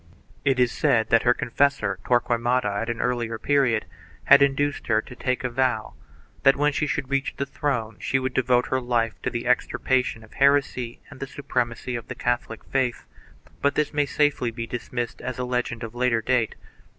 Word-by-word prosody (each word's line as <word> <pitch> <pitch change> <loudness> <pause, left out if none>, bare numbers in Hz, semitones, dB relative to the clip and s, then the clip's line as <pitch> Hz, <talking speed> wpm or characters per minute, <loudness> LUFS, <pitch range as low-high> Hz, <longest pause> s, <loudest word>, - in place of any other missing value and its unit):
It 135 -2 +2
is 125 -1 +3
said 115 -2 +2
that 115 - +6
her 120 - +4
confessor, 115 -6 0
Tqrquemada, 120 0 +1 0.2
at 115 - -3
an 120 - -2
earlier 120 -2 -1
period, 130 -5 +2 0.4
had - - +7
induced 140 +1 +1
her 110 -1 +3
to 125 - -8
take 125 0 -2
a 125 - 0
vow 120 -3 0 0.5
that, 135 - +6
when 145 +1 +2
she 150 - 0
should 140 -2 -3
reach 140 0 0
the 140 - -1
throne, 125 -6 -2
she 135 - 0
would 130 -1 -2
devote 125 -1 +2
her 130 0 0
life 120 -2 -1
to - - -1
the 120 0 -4
extirpation 125 -1 +1
of 110 - -17
heresy 140 -4 +1
and - - -12
the 135 - -4
suprem 125 -4 -2
acy 120 +2 -6
of 115 - -6
the - - -6
Catholic 120 -2 -2
faith, 130 -3 -1 0.6
but 140 - +2
this 150 -1 0
may 145 -1 +1
safely 145 -4 +1
be 115 0 -5
dismissed 120 0 -4
as 125 -1 -4
a 125 - -2
legend 125 -1 -2
of 115 0 -6
later 120 -2 +1
date. 120 -2 +1
125 Hz, 195 wpm, -24 LUFS, 115-135 Hz, 0.6 s, had